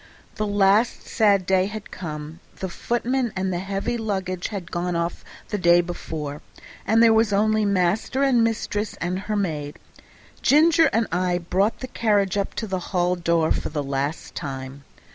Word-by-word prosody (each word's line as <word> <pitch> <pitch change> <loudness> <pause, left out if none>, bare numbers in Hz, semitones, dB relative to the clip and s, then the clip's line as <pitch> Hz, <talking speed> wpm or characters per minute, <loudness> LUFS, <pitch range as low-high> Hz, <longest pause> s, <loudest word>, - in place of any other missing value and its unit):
The 215 - -2
last 205 +3 +3
sad 200 -4 +3
day 190 0 +2
had 215 0 -8
come; 155 -1 -7 0.2
the 190 - -5
footman 240 +4 -1
and 190 0 -1
the 175 - -1
heavy 195 +5 -2
luggage 190 -4 -2
had 190 -5 -6
gone 175 0 -2
off 170 0 -2 0.3
the 210 - -2
day 175 -1 +5
before, 155 -4 -4 0.5
and 225 +2 +5
there 225 -1 +6
were 220 0 +5
only 215 +1 +2
master 200 +7 +1
and 250 -4 +4
mistress 215 -2 -1
and 180 +2 -2
her 210 +2 -3
maid. 155 -7 -2 0.6
Ginger 315 +1 +5
and 225 +1 +2
I 180 0 +1
brought 190 +5 0
the 255 - -4
carriage 205 -6 +1
up 200 -1 -2
to 225 - -3
the 190 -3 -2
hall 180 -1 +1
door 170 -2 +1
for - - -1
the 150 -1 -3
last 140 +3 -3
time. 135 -2 -6
190 Hz, 170 wpm, -23 LUFS, 170-215 Hz, 0.6 s, there